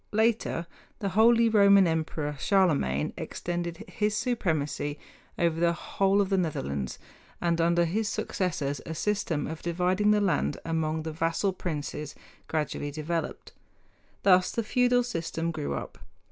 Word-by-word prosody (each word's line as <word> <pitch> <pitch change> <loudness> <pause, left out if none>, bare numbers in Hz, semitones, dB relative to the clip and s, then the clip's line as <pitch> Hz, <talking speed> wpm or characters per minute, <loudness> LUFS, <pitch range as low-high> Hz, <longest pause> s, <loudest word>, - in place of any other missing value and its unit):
Later 220 -5 +1 0.3
the 200 - -2
Holy 230 +4 +5
Roman 200 -3 +6
Emperor 155 -2 -1
Charlemagne 145 - +2
extended 175 +3 -4
his 210 0 -1
supremacy 155 - -1 0.4
over 170 -1 +1
the 170 0 +3
whole 195 +3 +1
of 195 - -1
the 195 -1 +2
Netherlands, 70 - -2 0.4
and 170 -1 +1
under 170 +1 +3
his 210 +6 -1
successors 160 -9 -2
a 165 - -4
system 195 -6 -1
of 160 0 -6
dividing 180 +4 +1
the 210 0 +5
land 200 -4 +1
among 160 -1 -1
the 160 - -4
vassal 165 +4 0
princes 150 -4 -5 0.3
gradually 150 -2 -2
developed. 155 +2 -4 0.7
Thus 185 -2 +5
the 230 - -1
feudal 245 +2 +3
system 165 -6 -3
grew 155 -3 -3
up. - - -7
170 Hz, 135 wpm, -28 LUFS, 160-200 Hz, 0.7 s, Roman